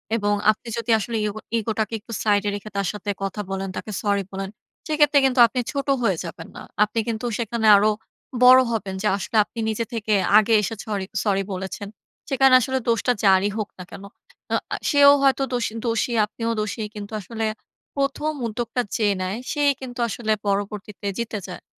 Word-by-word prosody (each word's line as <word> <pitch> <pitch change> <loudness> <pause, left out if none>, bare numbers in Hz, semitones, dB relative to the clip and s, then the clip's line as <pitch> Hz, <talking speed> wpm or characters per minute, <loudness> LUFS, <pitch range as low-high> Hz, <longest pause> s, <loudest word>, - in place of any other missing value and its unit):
এবং 205 -2 +1 0.2
আপনি 215 +3 -11
যদি 230 0 -1
আসলে 225 +2 -3
ইগো 210 +1 -3 0.2
ইগোটাকে 220 0 -2
একটু 230 +2 -10
সাইডে 205 -1 +2
রেখে 205 +1 -7
তার 200 -1 0
সাথে 205 0 -6
কথা 195 +2 -3
বলেন, 195 0 -3
তাকে 215 - -6
সরি 200 -1 +1
বলেন, 195 0 -4 0.4
সেই 305 -2 -1
ক্ষেত্রে 295 -1 +5
কিন্তু 260 -1 +1
আপনি 250 +3 -3
ছোট 280 -1 -3 0.2
হয়ে 195 -6 +2
যাবেন 165 -1 -8
না। - - -8 0.2
আপনি 215 +2 -1
কিন্তু 225 0 -3
সেখানে 230 -1 -1
আরো 210 +2 +3 0.5
বড় 255 +1 +9
হবেন, 200 -4 -3
যে - - +2
আসলে 210 +3 -3
আপনি 230 - -10
নিজে 220 +1 -2
থেকে 220 -2 -1 0.2
আগে 220 +1 +4
এসে 210 +2 -3
সরি- 205 -3 -3 0.2
সরি 195 -2 +1
বলেছেন। 190 +2 -5 0.4
সেখানে 270 -1 +4
আসলে 260 +2 -1
দোষটা 230 +2 +2
যারই 195 +1 +5
হোক 215 -2 -3
না - - -6
কেন। 195 - -9 0.5
আ - - +4
অ্যা - - -2
সেও 285 -1 +7
হয়তো 270 0 +3
দোষী, 235 -3 -1
দোষী। 230 +1 0
আপনিও 230 +2 -4
দোষী। 215 +1 -3
কিন্তু 205 0 -7
আসলে 225 +4 -4 0.5
১ম 280 +2 0 0.2
উদ্যোগটা 235 +2 -2 0.2
যে 215 - +2
নেয়, 185 +3 -2 0.2
সেই 290 -1 +3
কিন্তু 245 -1 -8
আসলে 220 0 -2 0.2
পরবর্তীতে 205 0 -3
জিতে 225 -2 -3
যায়। 180 - -9
220 Hz, 185 wpm, -23 LUFS, 205-240 Hz, 0.5 s, বড়